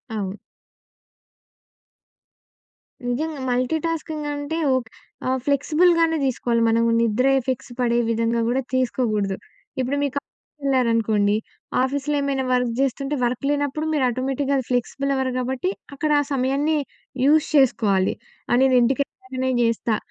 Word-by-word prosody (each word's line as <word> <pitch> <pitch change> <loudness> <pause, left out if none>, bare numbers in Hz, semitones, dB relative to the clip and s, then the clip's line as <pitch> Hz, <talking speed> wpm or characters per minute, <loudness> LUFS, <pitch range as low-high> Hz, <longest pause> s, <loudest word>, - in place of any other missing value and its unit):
అవును. 200 -1 -3 2.7
నిజంగా. 290 +5 -2
మల్టీటాస్కింగ్ 310 +4 -1
అంటే 290 +3 -3 0.2
ఓక్ 250 -3 -2 0.4
ఆహ్, 260 0 +1
ఫ్లెక్సిబుల్‌గానే 325 +3 +3
దీసుకోవాలి 235 -2 0
మనం. 230 +1 +3 0.2
నిద్ర 235 +3 +2
ఎఫెక్ట్స్ 255 -1 -4
పడే 240 -1 +2
విధంగా 230 +1 +1
గూడా 260 +2 +1
తీసుకోకూడదు. 215 -6 0 0.4
ఇప్పుడు 260 +3 0
మీకు 280 -1 -2
ఆఫీస్ - - -77
వెళ్లారనుకోండి, 225 -6 +2 0.5
ఆఫీస్‌లో 285 +2 -1
ఏమైనా 275 -1 0
వర్క్ 250 -1 +1
జేస్తుంటే 275 +2 0
వర్క్ 245 +1 -2
లేనప్పుడు 290 +1 -1
మీరు 295 -3 +1
ఆటోమేటిక్‌గా 270 +3 -1
ఫ్లెక్సిబుల్ 265 +3 -1
అవర్ 265 -1 0
గాబట్టి, 260 +8 -1 0.2
అక్కడ 305 +1 -1
ఆ 290 - +1
సమయాన్ని 275 +4 +1 0.5
యూజ్ 305 +2 +4
చేసుకోవాలి. 210 -8 +3 0.4
ఆ! - - +4
నేను 265 -1 +4
ఇంటికెళ్ళాకనే 260 0 -1
జేస్తా. 230 -1 +1
260 Hz, 115 wpm, -23 LUFS, 235-285 Hz, 2.7 s, యూజ్